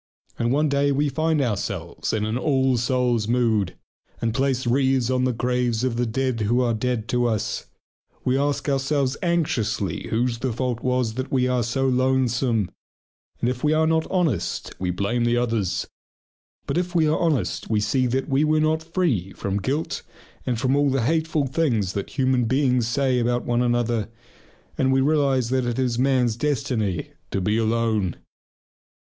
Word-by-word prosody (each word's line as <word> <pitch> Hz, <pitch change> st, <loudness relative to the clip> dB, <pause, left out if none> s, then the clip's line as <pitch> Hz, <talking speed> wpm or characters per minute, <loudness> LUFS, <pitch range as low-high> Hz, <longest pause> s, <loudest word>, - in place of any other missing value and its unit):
And 120 Hz, 0 st, +1 dB
one 150 Hz, +3 st, +2 dB
day 140 Hz, 0 st, +2 dB
we 145 Hz, +1 st, +1 dB
find 155 Hz, +1 st, +1 dB
ourselves 110 Hz, -6 st, -3 dB
in 105 Hz, -1 st, 0 dB
an 110 Hz, +1 st, -2 dB
all 130 Hz, 0 st, +2 dB
souls' 120 Hz, -2 st, +1 dB
mood, 110 Hz, -6 st, +1 dB, 0.4 s
and 115 Hz, -1 st, -1 dB
place 130 Hz, 0 st, 0 dB
wreaths 130 Hz, 0 st, +2 dB
on 130 Hz, 0 st, +1 dB
the 130 Hz, -, +2 dB
graves 125 Hz, -1 st, 0 dB
of 130 Hz, -3 st, 0 dB
the 120 Hz, 0 st, 0 dB
dead 130 Hz, +1 st, -1 dB
who 115 Hz, +4 st, +2 dB
are 120 Hz, -2 st, +1 dB
dead 115 Hz, 0 st, -2 dB
to 120 Hz, -1 st, +2 dB
us. 110 Hz, -3 st, -2 dB, 0.6 s
We 130 Hz, -, +2 dB
ask 145 Hz, +1 st, 0 dB
ourselves 135 Hz, -1 st, +1 dB
anxiously 135 Hz, -, -1 dB
whose 115 Hz, +1 st, 0 dB
the 125 Hz, 0 st, -1 dB
fault 125 Hz, 0 st, -2 dB
was 125 Hz, -3 st, 0 dB
that 130 Hz, +3 st, -4 dB
we 125 Hz, -2 st, +2 dB
are 125 Hz, -1 st, +1 dB
so 125 Hz, +4 st, 0 dB
lonesome. 125 Hz, -4 st, +1 dB, 0.7 s
And -, -, +1 dB
if 125 Hz, 0 st, -2 dB
we 150 Hz, 0 st, +3 dB
are 160 Hz, 0 st, +3 dB
not 160 Hz, 0 st, +1 dB
honest 165 Hz, -, -1 dB
we 90 Hz, -, -1 dB
blame 100 Hz, +7 st, 0 dB
the 120 Hz, 0 st, +2 dB
others. 110 Hz, -7 st, 0 dB, 0.8 s
But -, -, 0 dB
if 180 Hz, 0 st, -4 dB
we 160 Hz, -2 st, +4 dB
are 155 Hz, -, +1 dB
honest 150 Hz, -, 0 dB
we 110 Hz, -1 st, +2 dB
see 125 Hz, +5 st, +1 dB
that 130 Hz, +2 st, -1 dB
we 140 Hz, 0 st, +2 dB
were 155 Hz, 0 st, +3 dB
not 155 Hz, +1 st, +1 dB
free 160 Hz, -, -1 dB
from 100 Hz, +1 st, -3 dB
guilt 145 Hz, +8 st, -2 dB, 0.5 s
and 120 Hz, -3 st, 0 dB
from 130 Hz, +2 st, +2 dB
all 145 Hz, 0 st, +3 dB
the 135 Hz, -3 st, 0 dB
hateful 160 Hz, +1 st, +1 dB
things 120 Hz, -, 0 dB
that 100 Hz, +7 st, -5 dB
human 130 Hz, -2 st, +2 dB
beings 125 Hz, -1 st, +2 dB
say 130 Hz, +1 st, +1 dB
about 120 Hz, +1 st, 0 dB
one 120 Hz, 0 st, +1 dB
another, 120 Hz, -3 st, 0 dB, 0.7 s
and 130 Hz, 0 st, +3 dB
we 135 Hz, -, +3 dB
realize 135 Hz, -4 st, +2 dB
that 130 Hz, -2 st, +1 dB
it 120 Hz, -, -2 dB
is 125 Hz, -2 st, 0 dB
man's 125 Hz, -3 st, +2 dB
destiny 115 Hz, -, -1 dB, 0.2 s
to -, -, -1 dB
be 105 Hz, +3 st, 0 dB
alone. 110 Hz, -5 st, 0 dB
125 Hz, 175 wpm, -23 LUFS, 115-135 Hz, 0.8 s, we